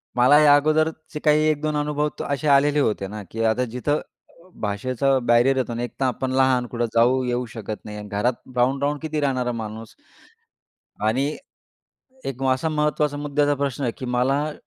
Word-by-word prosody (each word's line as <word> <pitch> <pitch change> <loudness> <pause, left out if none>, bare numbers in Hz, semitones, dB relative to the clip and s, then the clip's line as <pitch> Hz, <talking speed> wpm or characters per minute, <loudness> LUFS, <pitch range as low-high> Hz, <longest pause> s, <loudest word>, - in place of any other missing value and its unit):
मला 130 +4 +6
या 150 -1 +7
अगोदरचे 155 +1 0
काही 150 0 +5
1 150 -2 0
2 155 -1 -1
अनुभव 150 0 0 0.2
असे 140 +1 -2
आलेले 145 +1 +4
होते 105 -7 0
ना, 105 +1 -7
की 115 0 -2
आता 115 +3 +2
जिथं 145 +4 -1 0.6
भाषेचं 130 +5 0
बॅरियर 120 +3 +4
येतो 130 -2 -1
आणि 120 +1 -3
एक 120 - -5
तर 135 - +1
आपण 130 +1 -1
लहान. 130 -1 +2
कुठे 120 0 -2
जाऊ 125 +3 +4
येऊ 125 0 -1
शकत 110 -2 -7
नाही 105 -1 -7
आणि 105 0 -8
घरात 105 +5 0 0.2
राहून-राहून 135 +4 +1
किती 155 -1 -3
राहणार 130 -3 0
माणूस. 110 +1 -8 1.1
आणि 130 +5 +1 1.0
एक 135 -1 -5
असा 130 +5 -1
महत्त्वाचा 150 -1 0
मुद्याचा 145 0 +1
प्रश्न 140 -1 -3
आहे, 120 - 0
की 130 - -5
मला 135 +5 0
130 Hz, 170 wpm, -23 LUFS, 120-145 Hz, 1.1 s, या